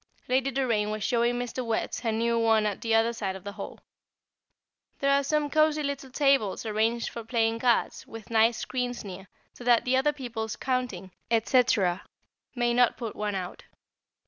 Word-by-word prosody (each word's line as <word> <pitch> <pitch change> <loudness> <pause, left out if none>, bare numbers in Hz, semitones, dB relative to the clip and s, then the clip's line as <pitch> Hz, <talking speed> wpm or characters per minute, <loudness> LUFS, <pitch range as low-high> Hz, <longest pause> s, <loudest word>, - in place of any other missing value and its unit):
Lady 260 +2 +2
Doraine 235 -6 0
was 215 -1 -3
showing 240 0 +1
Mr. 245 +1 -3
Wertz 230 -2 -2
her 230 -2 -1
new 230 +1 +1
one 225 -1 +3
at 205 -2 -2
the 225 -1 +1
other 225 +1 +3
side 195 -5 -3
of 190 - -10
the 200 - -5
hall. - - -8 1.2
There 275 0 +1
are 280 0 +3
some 300 +1 +1
cosy 310 0 +2
little 280 -1 -4
tables 270 -7 +1
arranged 225 +2 0
for 230 - -7
playing 225 0 0
cards, 240 -1 +1
with 225 -1 -10
nice 225 +1 +4
screens 245 -3 -3
near, 190 0 -8 0.3
so - - -11
that 240 -1 +4
the 250 +1 +2
other 280 +3 +3
people's 235 -6 -5
counting, 245 -8 -3 0.2
&c., 235 +3 +4 0.9
may 240 -1 +1
not 245 -1 +3
put 230 -3 -5
one 210 -1 -2
out. 185 -1 -6
235 Hz, 175 wpm, -27 LUFS, 220-255 Hz, 1.2 s, nice